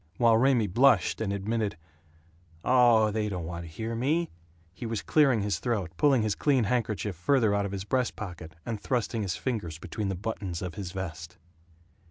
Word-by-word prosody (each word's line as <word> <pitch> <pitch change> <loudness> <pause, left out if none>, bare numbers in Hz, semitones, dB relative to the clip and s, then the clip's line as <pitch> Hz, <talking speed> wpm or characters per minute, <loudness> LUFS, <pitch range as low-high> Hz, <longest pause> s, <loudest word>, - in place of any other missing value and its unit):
While 115 -2 +5
Raymie 125 -2 +3
blushed 120 +8 +3
and 105 -3 -1
admitted, 100 0 -2 0.9
"Oh, 120 -4 +5
they 105 0 -1
don't 90 -4 -4
want 85 0 -6
to 80 - -10
hear 110 +8 -4
me," 150 +9 0 0.4
he 115 +5 -6
was 115 -2 -3
clearing 135 -8 +3
his 100 0 -1
throat, 105 -9 -2
pulling 135 - +3
his 110 -2 +1
clean 135 -1 +2
handkerchief 110 -3 -1
farther 110 - +2
out 100 0 +1
of - - -7
his 100 -1 -4
breast 125 +3 0
pocket, 85 -6 -8
and 110 -3 -4
thrusting 120 -2 -1
his 95 -4 -2
fingers 100 -11 -3
between 95 +4 -4
the 95 - -2
buttons 95 -3 -4
of 90 -2 -4
his 95 -4 -6
vest. 90 -2 -6
105 Hz, 185 wpm, -28 LUFS, 95-120 Hz, 0.9 s, While